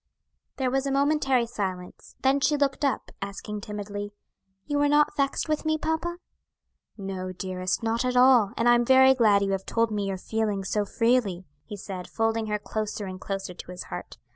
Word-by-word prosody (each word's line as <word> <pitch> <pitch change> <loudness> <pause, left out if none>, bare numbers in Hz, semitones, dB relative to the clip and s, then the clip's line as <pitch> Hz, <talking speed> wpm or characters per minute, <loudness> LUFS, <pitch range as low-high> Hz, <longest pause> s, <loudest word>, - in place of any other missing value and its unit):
There 260 -2 -1
was 270 +1 0
a - - -1
momentary 275 -3 +2
silence; 190 -6 -6
then 270 +1 +4
she 295 +1 +2
looked 280 0 0
up, 275 - -1
asking 200 +1 -5
timidly, 205 0 -6 0.5
"You 290 -1 0
are 290 - +3
not 295 0 +3
vexed 275 +2 0
with 305 -1 -1
me, 315 0 +1
papa?" 320 +2 -2 0.8
"No, 190 -2 -5
dearest; 185 +1 -3
not 230 +2 0
at 250 0 0
all; 250 -5 +6
and 230 - +2
I 240 - +7
am 240 0 +4
very 265 +1 +6
glad 215 -5 +4
you 195 - 0
have 195 0 -1
told 230 -1 +1
me 205 -2 -1
your 195 -1 -2
feelings 205 -1 -2
so 210 -1 +1
freely," 220 -5 +1 0.2
he 205 - -7
said, 185 -2 -7
folding 225 0 0
her 210 0 0
closer 210 0 -4
and 185 0 -7
closer 195 -2 -4
to 180 - -11
his 180 0 -6
heart. 90 -7 -7
220 Hz, 190 wpm, -26 LUFS, 195-265 Hz, 0.8 s, I